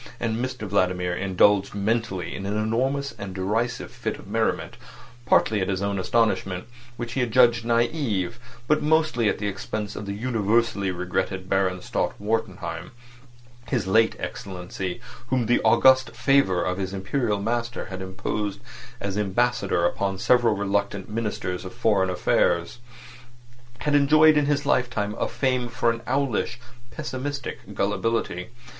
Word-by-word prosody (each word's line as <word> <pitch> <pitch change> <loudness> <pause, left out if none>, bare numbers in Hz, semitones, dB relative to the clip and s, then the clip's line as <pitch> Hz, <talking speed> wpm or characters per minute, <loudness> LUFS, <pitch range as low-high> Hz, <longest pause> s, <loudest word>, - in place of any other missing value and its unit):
And 115 +1 -1
Mr 130 -4 -4
Vladimir 90 -2 +1
indulged 100 +2 +3
mentally 100 -4 -1
in 100 - -5
an 105 +1 -1
enormous 130 +6 0
and 95 -2 -6
derisive 105 +6 -1
fit - - -4
of - - -13
merriment, - - -1 0.5
partly 110 -2 +3
at 95 - -1
his 95 0 -1
own 100 -1 -1
astonishment, 95 -3 +1 0.3
which 120 -1 -5
he 135 - +1
judged 120 0 +4
naive, 115 - 0 0.3
but 150 0 +3
mostly 150 -7 +2
at - - -1
the 105 - -4
expense 105 +1 -4
of 105 - -6
the 100 - -2
universally 110 -2 +1
regretted 95 +1 -2
Baron 95 -1 0
Stott - - -2
Wartenheim. 110 +3 -3 0.7
His 120 -8 0
late 110 +4 +3
Excellency, 90 -1 -5 0.3
whom 125 -2 +1
the 120 +2 +3
august 130 -3 +5
favour 130 -9 +3
of 90 +1 -2
his 95 0 -3
Imperial 105 +2 -1
master 115 +3 -2
had 95 0 -5
imposed 95 +2 -3 0.4
as 100 0 -2
Ambassador 100 -3 +1
upon 95 +2 0
several 120 +1 +3
reluctant 100 0 -1
Ministers 105 -5 -3
of 95 +4 -8
Foreign 105 -5 +2
Affairs, 85 +2 +1 1.0
had 150 +2 -1
enjoyed 155 +2 +6
in 150 -1 +3
his 145 0 +1
lifetime 120 -6 +1
a - - +1
fame 125 -3 0
for 120 0 +1
an 115 0 -5
owlish, 125 -3 0 0.3
pessimistic 130 -4 -5
gullibility. 105 -1 -1
110 Hz, 140 wpm, -25 LUFS, 95-120 Hz, 1.0 s, enjoyed